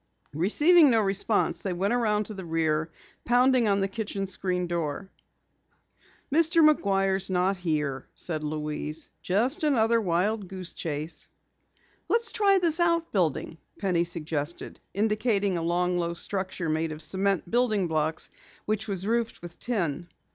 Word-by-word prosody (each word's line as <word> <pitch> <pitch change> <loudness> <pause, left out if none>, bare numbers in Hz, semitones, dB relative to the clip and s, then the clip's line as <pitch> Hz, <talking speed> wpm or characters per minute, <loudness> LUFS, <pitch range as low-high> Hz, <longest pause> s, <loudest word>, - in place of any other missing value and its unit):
Receiving 295 - +5
no 230 -3 +4
response, 200 +1 +1
they 190 - -2
went 195 +5 0
around 215 -3 +1
to 215 - -8
the 190 -2 -7
rear, 160 -1 0 0.3
pounding 245 0 +3
on 200 -1 +2
the 195 - +1
kitchen 200 -1 -4
screen 180 -1 -2
door. 170 +2 -3 1.2
"Mr. 330 0 +5
McGuire's 195 -8 +1
not 185 +1 +1
here," 150 -6 -2
said 155 -3 -4
Louise. 150 +1 -4
"Just 245 - 0
another 230 -6 +3
wild 195 +3 0
goose 185 -1 -5
chase." 155 -1 -4 0.8
"Let's 465 0 +2
try 400 -2 +3
this 340 -2 +3
out 335 -1 +2
building," 165 -3 -1 0.2
Penny 180 -4 +1
suggested, 165 -2 -3 0.2
indicating 210 -2 +1
a 170 - -2
long, 175 +1 0
low 170 0 -2
structure 185 -1 -2
made 160 +1 -1
of 155 0 -6
cement 190 +1 0
building 220 -6 +2
blocks 160 0 -1 0.3
which 215 +1 -2
was 195 -2 -2
roofed 230 -3 -1
with 175 0 -9
tin. 175 - -2
195 Hz, 140 wpm, -27 LUFS, 170-225 Hz, 1.2 s, Receiving